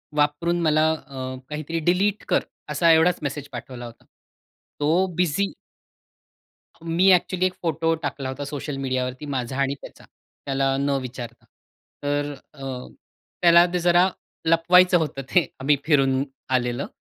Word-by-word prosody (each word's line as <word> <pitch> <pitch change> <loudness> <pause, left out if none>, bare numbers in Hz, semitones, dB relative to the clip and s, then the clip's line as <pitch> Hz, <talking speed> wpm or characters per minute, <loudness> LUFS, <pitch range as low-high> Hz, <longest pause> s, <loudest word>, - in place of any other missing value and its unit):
वापरून 150 +4 +1
मला 155 0 +3
अ, 130 -4 -6
काहीतरी, 155 +2 -3
"डिलीट 190 +6 +1
कर". - - +2 0.3
असा 165 +3 +3
एवढाच 165 +2 +4
मेसेज 145 0 -4
पाठवला 120 0 -7
होता. 115 - -13 0.7
तो 165 +6 +3
बिझी 180 +3 +1 1.3
मी 175 +4 +4
एक्चुअली 185 +1 +1
एक 185 - 0
फोटो 165 0 0
टाकला 140 -2 -3
होता 140 +2 -5
सोशल 145 0 -5
मीडियावरती 130 +1 -2
माझा 130 -2 -3
आणि 135 +1 0
त्याचा, - - -12 0.4
त्याला 135 -1 +1
न 140 +1 0
विचारता. 120 -2 -8 0.6
तर 145 0 -1 0.2
अ, 135 -2 -12 0.8
त्याला 170 0 +7
ते 180 - +1
जरा 175 +2 +4 0.4
लपवायचं 175 +2 +5
होतं 150 -4 -2
ते, 175 -6 +4
आम्ही 145 +2 +3
फिरून 135 -3 +3 0.3
आलेलं 125 0 0
150 Hz, 135 wpm, -24 LUFS, 135-170 Hz, 1.3 s, त्याला